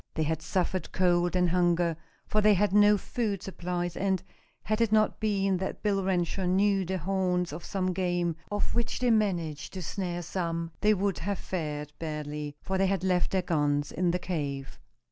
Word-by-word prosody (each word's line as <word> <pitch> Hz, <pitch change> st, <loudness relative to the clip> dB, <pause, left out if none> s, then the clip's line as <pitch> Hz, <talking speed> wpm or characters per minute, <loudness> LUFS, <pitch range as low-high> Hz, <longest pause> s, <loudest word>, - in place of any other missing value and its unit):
They 160 Hz, -, +1 dB
had 160 Hz, 0 st, -1 dB
suffered 185 Hz, +2 st, -1 dB
cold 175 Hz, -1 st, +2 dB
and 180 Hz, -1 st, +3 dB
hunger, 175 Hz, -1 st, +2 dB, 0.3 s
for 215 Hz, -, +1 dB
they 210 Hz, 0 st, +6 dB
had 200 Hz, +1 st, +2 dB
no 210 Hz, 0 st, +6 dB
food 205 Hz, -1 st, -2 dB
supplies, 175 Hz, -2 st, -3 dB
and, 190 Hz, -2 st, 0 dB, 0.4 s
had 215 Hz, +1 st, 0 dB
it 230 Hz, -2 st, +2 dB
not 215 Hz, 0 st, +3 dB
been 195 Hz, -3 st, +1 dB
that 190 Hz, +1 st, -4 dB
Bill 200 Hz, -2 st, +1 dB
Renshaw 185 Hz, 0 st, 0 dB
knew 195 Hz, +2 st, +3 dB
the 190 Hz, +1 st, -2 dB
haunts 180 Hz, 0 st, 0 dB
of 170 Hz, +3 st, -7 dB
some 185 Hz, -2 st, -1 dB
game, 175 Hz, -2 st, 0 dB, 0.2 s
of 205 Hz, -, -1 dB
which 235 Hz, -1 st, -1 dB
they 250 Hz, -1 st, +2 dB
managed 175 Hz, -9 st, 0 dB
to 185 Hz, -2 st, -5 dB
snare 175 Hz, 0 st, -3 dB
some, 170 Hz, -1 st, -2 dB
they 215 Hz, 0 st, +4 dB
would 195 Hz, -1 st, 0 dB
have 200 Hz, +2 st, -2 dB
fared 150 Hz, -4 st, -4 dB
badly, 150 Hz, -2 st, -4 dB
for 190 Hz, 0 st, -1 dB
they 195 Hz, -, +4 dB
had 190 Hz, -2 st, 0 dB
left 180 Hz, -2 st, +2 dB
their 190 Hz, -1 st, 0 dB
guns 145 Hz, -4 st, +1 dB
in 180 Hz, -1 st, +1 dB
the 175 Hz, -, +1 dB
cave. 140 Hz, -7 st, -4 dB
180 Hz, 185 wpm, -29 LUFS, 170-195 Hz, 0.4 s, they